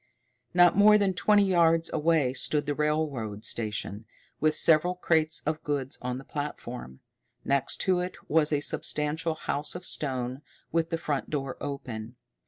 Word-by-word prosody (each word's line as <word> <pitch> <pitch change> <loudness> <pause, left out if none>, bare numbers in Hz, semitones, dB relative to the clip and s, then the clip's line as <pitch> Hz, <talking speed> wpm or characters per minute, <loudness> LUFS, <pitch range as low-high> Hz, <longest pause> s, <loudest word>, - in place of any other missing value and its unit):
Not 175 -1 +6
more 210 +1 +7
than 200 -2 +1
twenty 205 +3 +3
yards 165 -3 +3
away 155 -4 +2
stood 145 +2 0
the 145 - -1
railroad 145 -9 -2
station, 105 -1 -4 0.3
with 155 0 +2
several 165 +3 +4
crates 160 -3 +1
of 155 +1 -2
goods 140 -3 -3
on 125 0 -3
the 135 - -9
platform. 125 - -6 0.4
Next 140 -1 +1
to 185 -2 +2
it 180 +1 -4
was 155 -1 +2
a 145 -1 +1
substantial 155 +2 -1
house 150 0 -2
of 180 0 -6
stone, 130 -2 -2 0.3
with 165 0 0
the 165 - -1
front 150 -4 -3
door 135 -3 -3
open. 125 -5 -6
150 Hz, 155 wpm, -28 LUFS, 135-165 Hz, 0.4 s, more